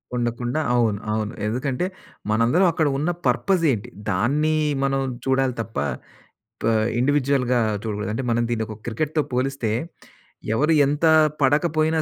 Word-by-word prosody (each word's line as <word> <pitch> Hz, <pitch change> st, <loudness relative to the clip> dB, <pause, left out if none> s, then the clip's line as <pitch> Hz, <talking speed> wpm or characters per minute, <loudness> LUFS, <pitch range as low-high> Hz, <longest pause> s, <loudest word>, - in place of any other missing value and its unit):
ఉండకుండా 120 Hz, +3 st, -1 dB
అవును, 115 Hz, -4 st, +2 dB
అవును. 110 Hz, +1 st, -2 dB
ఎందుకంటే 130 Hz, +7 st, -1 dB, 0.5 s
మనందరం 115 Hz, -, +3 dB
అక్కడ 160 Hz, -2 st, +1 dB
ఉన్న 150 Hz, +5 st, -1 dB, 0.2 s
పర్పస్ 170 Hz, +8 st, +2 dB
ఏంటి? 110 Hz, -5 st, -3 dB, 0.2 s
దాన్ని 140 Hz, +11 st, +1 dB, 0.3 s
మనం 135 Hz, 0 st, +1 dB, 0.2 s
చూడాలి 130 Hz, -1 st, +1 dB
తప్ప 115 Hz, 0 st, -8 dB, 0.9 s
ప -, -, 0 dB, 0.3 s
ఇండివిడ్యుయల్‌గా 130 Hz, -2 st, +2 dB, 0.2 s
చూడకూడదు. 105 Hz, -1 st, -3 dB
అంటే 130 Hz, -, -3 dB
మనం 120 Hz, +1 st, +1 dB
దీన్ని 115 Hz, -2 st, -1 dB
ఒక 110 Hz, -, -7 dB
క్రికెట్‌తో 150 Hz, +7 st, -1 dB
పోలిస్తే, 130 Hz, -2 st, -1 dB, 0.8 s
ఎవరు 150 Hz, +7 st, +3 dB
ఎంత 145 Hz, +4 st, 0 dB, 0.4 s
పడకపోయినా 155 Hz, +3 st, +2 dB
130 Hz, 125 wpm, -23 LUFS, 115-150 Hz, 0.9 s, మనందరం